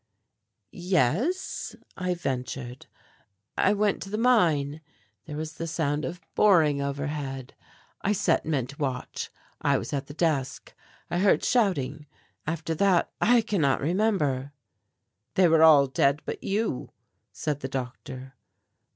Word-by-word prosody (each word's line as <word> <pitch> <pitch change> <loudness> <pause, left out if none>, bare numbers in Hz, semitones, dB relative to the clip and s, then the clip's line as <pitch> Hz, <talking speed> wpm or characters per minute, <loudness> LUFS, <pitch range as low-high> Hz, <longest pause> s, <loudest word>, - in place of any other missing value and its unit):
"Yes," 185 - 0 0.2
I 180 -1 -1
ventured, 130 -4 -4 0.7
"I 200 - +3
went 210 0 +1
to 195 - -6
the 215 - -2
mine, 160 - +2 0.4
there 150 - -6
was 155 +1 -4
the 165 - -3
sound 150 -2 -1
of 175 +1 -5
boring 160 -9 +4
overhead. 140 -2 -4 0.5
I 200 - +1
set 200 0 +2
men 145 -6 0
to 140 +3 -12
watch; 130 -4 -3 0.3
I - - +3
was - - -5
at 140 -1 -2
the 145 - -10
desk, 155 -6 -1 0.4
I 175 - 0
heard 195 +1 +3
shouting, 150 - +1 0.4
after 165 0 -2
that 185 +1 +2
I 240 +1 +5
cannot 175 - +1
remember." 150 -6 0 0.8
"They 185 -1 +5
were 160 -1 +4
all 155 -3 +8
dead 140 +2 +1
but - - -5
you," 205 - -1 0.4
said 150 -3 -3
the 130 - -4
doctor. 130 0 -6
155 Hz, 135 wpm, -27 LUFS, 140-185 Hz, 0.8 s, all